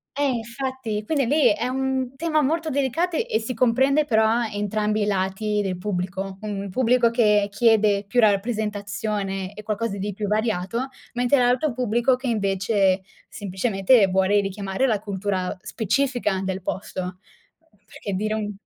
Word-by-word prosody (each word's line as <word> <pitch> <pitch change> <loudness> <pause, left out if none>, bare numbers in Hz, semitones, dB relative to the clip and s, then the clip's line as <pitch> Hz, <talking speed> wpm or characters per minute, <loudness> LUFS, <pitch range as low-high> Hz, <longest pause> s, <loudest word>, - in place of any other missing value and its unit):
Eh, 285 0 +1
infatti, 235 -2 -4
quindi 280 -2 +1
lì, 290 -6 +4
è 240 +4 -2
un 265 0 -2
tema 310 0 +1
molto 320 +3 0
delicate, 295 +5 0
e 220 - +1
si 235 +3 -4
comprende 265 +5 +3
però 220 -1 +3
entrambi 210 +1 -1
i - - +1
lati 205 +2 0
del 185 -3 -2
pubblico: 190 0 -3
un 200 -2 -4
pubblico 240 0 +3
che 210 -4 +3
chiede 210 -2 +3
più 245 +4 +1
rappresentazione 205 -2 -1
e 215 - -9
qualcosa 215 -1 -2
di 200 +1 -3
più 205 +1 -4
variato; 220 +3 -1 0.3
mentre 245 +3 +2
l'altro 250 +4 +2
pubblico 240 +1 +1
che 255 +1 -6
invece, 195 -2 +1 0.3
semplicemente, 195 +2 +2
vuole 190 +2 +3
richiamare 195 +5 -1
la 215 -4 +1
cultura 190 -2 -2
specifica 220 -2 0
del 190 -1 -3
posto. 185 -1 -4
Uhm, 205 - -12
perché 200 - -7
dire 215 +3 -1
un 210 -1 -2
215 Hz, 150 wpm, -23 LUFS, 195-250 Hz, 0.3 s, lì